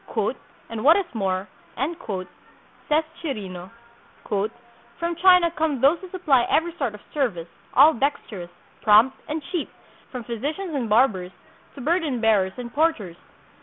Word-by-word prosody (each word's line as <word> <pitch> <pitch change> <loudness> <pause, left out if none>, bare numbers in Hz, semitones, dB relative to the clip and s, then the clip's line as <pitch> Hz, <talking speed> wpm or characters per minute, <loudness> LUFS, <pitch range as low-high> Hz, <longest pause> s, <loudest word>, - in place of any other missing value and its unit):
"And 225 -1 -5
what 315 +6 +7
is 400 - 0
more," 190 -3 -1 1.4
says 305 +2 +3 0.2
Chirino, 190 - -5 0.6
"from 235 +9 -4
China 360 -2 +6
come 315 -5 -1
those 285 +7 +4
who 375 - -10
supply 310 -9 +2
every 335 +2 +1
sort 245 -7 -2
of 210 - -13
service, 215 - -1 0.3
all 295 +4 +8
dexterous, 225 -9 -3 0.3
prompt, 220 +5 +5
and 305 0 -3
cheap, 350 -5 -2 0.4
from 250 -2 -5
physicians 295 - -4
and 250 -6 -2
barbers 210 -6 +3 0.4
to 280 - -8
burden 310 -3 0
bearers 205 -4 +2
and 240 -1 -7
porters. 265 - 0
255 Hz, 130 wpm, -24 LUFS, 215-320 Hz, 1.4 s, all